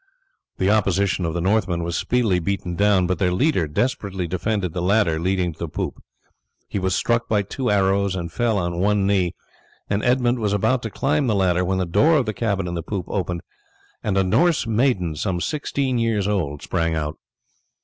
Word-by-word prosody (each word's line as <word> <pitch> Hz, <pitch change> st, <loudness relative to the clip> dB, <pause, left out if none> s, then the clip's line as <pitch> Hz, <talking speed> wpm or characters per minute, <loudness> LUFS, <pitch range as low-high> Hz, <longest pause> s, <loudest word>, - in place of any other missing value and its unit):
The 95 Hz, +2 st, +2 dB
opposition 100 Hz, -3 st, +1 dB
of 80 Hz, 0 st, -2 dB
the 85 Hz, -, -1 dB
Northmen 95 Hz, -3 st, +1 dB
was 85 Hz, 0 st, -3 dB
speedily 110 Hz, -3 st, +1 dB
beaten 90 Hz, 0 st, -3 dB
down, 100 Hz, -1 st, +3 dB
but 90 Hz, +1 st, -1 dB
their 90 Hz, -3 st, +2 dB
leader 95 Hz, -, +1 dB
desperately 100 Hz, -, -2 dB
defended 90 Hz, 0 st, -2 dB
the 90 Hz, -, -2 dB
ladder 90 Hz, -3 st, +2 dB
leading 90 Hz, 0 st, 0 dB
to -, -, -25 dB
the 85 Hz, -, -3 dB
poop. -, -, -4 dB, 0.7 s
He 100 Hz, -, -3 dB
was 95 Hz, -1 st, 0 dB
struck 115 Hz, 0 st, 0 dB
by 105 Hz, -2 st, +2 dB
two 125 Hz, +6 st, -3 dB
arrows, 100 Hz, -1 st, +2 dB
and 85 Hz, -2 st, -4 dB
fell 115 Hz, +1 st, 0 dB
on 85 Hz, -2 st, -2 dB
one 100 Hz, +1 st, +2 dB
knee, 95 Hz, -3 st, +1 dB, 0.6 s
and 100 Hz, +1 st, 0 dB
Edmund 125 Hz, 0 st, +2 dB
was 105 Hz, -2 st, 0 dB
about 120 Hz, +5 st, +1 dB
to 115 Hz, -, -4 dB
climb 140 Hz, +5 st, 0 dB
the 110 Hz, -, +2 dB
ladder 90 Hz, -2 st, +2 dB
when 95 Hz, +1 st, 0 dB
the 95 Hz, -, 0 dB
door 155 Hz, -, +4 dB
of 135 Hz, -, +1 dB
the 110 Hz, -, -2 dB
cabin 100 Hz, -5 st, -1 dB
in 85 Hz, -, -4 dB
the 85 Hz, -, -2 dB
poop 95 Hz, +1 st, -4 dB
opened, 90 Hz, -3 st, -2 dB, 0.6 s
and 100 Hz, -2 st, 0 dB
a 95 Hz, -, +4 dB
Norse 165 Hz, -, +2 dB
maiden 110 Hz, -, +1 dB
some 90 Hz, +3 st, -2 dB
sixteen 135 Hz, -, -1 dB
years 110 Hz, -4 st, +1 dB
old 75 Hz, -9 st, -2 dB
sprang 85 Hz, -2 st, 0 dB
out. 75 Hz, -1 st, -3 dB
95 Hz, 200 wpm, -22 LUFS, 90-110 Hz, 0.7 s, door